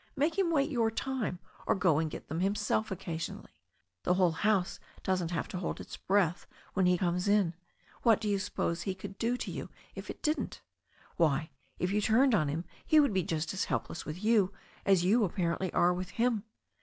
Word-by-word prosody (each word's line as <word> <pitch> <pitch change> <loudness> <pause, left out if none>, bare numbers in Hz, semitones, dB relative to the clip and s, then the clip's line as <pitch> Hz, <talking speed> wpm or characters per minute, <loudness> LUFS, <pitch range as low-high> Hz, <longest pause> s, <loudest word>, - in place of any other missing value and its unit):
Make 300 +3 +1
him 370 -3 +3
wait 305 -2 +2
your 230 -4 +2
time, 245 -4 -2 0.3
or - - +4
go 180 -6 +3
and 160 -1 0
get - - -8
them 160 +3 -3
himself 210 +3 +1
occasionally. 170 -4 -5 0.5
The 180 - +2
whole 180 -2 +4
house 190 +2 +1 0.2
doesn't 185 -3 0
have 170 - -2
to 180 - -4
hold 180 - -3
its - - -8
breath 185 -3 +1 0.3
when 190 -1 +3
he 180 0 +4
comes 180 +1 0
in. 200 -4 +3 0.5
What 225 -3 +5
do 220 - -3
you 200 -1 +1
suppose 170 -2 -2
he 190 0 -2
could 195 +1 -9
do 240 +2 +1
to - - -4
you - - -5 0.2
if - - -8
it - - -7
didn't? 305 +1 -1 0.6
Why, 155 -2 +2 0.3
if 180 - -1
you 210 +1 +2
turned 245 +5 +4
on 155 -8 +3
him 160 +5 -2 0.2
he 310 - +5
would 285 -7 +4
be 190 - +2
just 160 0 -2
as 190 - -1
helpless - - -3
with 160 +6 -7
you 210 -4 +4 0.4
as 190 -3 +4
you 220 +5 +4
apparently 180 -1 -1
are 175 +1 +4
with 180 0 -4
him. 225 0 0
190 Hz, 205 wpm, -31 LUFS, 175-220 Hz, 0.6 s, What